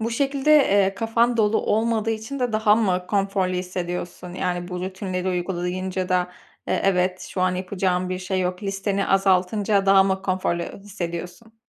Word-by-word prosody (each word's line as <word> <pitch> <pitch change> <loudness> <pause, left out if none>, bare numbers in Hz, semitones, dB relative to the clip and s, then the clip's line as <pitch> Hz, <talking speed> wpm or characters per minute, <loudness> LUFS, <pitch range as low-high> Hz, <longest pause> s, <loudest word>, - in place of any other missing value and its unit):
Bu 230 +1 -1
şekilde, 275 +4 0
eee, 200 -8 +3
kafan 230 +2 +1
dolu 220 0 +3
olmadığı 225 0 0
için 220 +5 -4
de 245 -3 0
daha 215 -1 +4
mı 185 -5 0
konforlu 195 -2 0
hissediyorsun? 180 -1 -4
Yani 175 -1 -2
bu 180 -1 -5
rutinleri 185 0 -3
uygulayınca 180 +1 -2
da, 180 -1 +1 0.4
eee, - - +1
"Evet, 185 -1 +1
şu 185 - -5
an 185 0 +2
yapacağım 185 -1 -1
bir 185 0 -3
şey 185 0 -2
yok.", 180 +2 -2
listeni 195 0 -1
azaltınca 195 +1 +2
daha 195 0 +7
mı 190 0 -1
konforlu 185 -3 -1
hissediyorsun? 195 +3 -7
190 Hz, 160 wpm, -23 LUFS, 180-210 Hz, 0.4 s, daha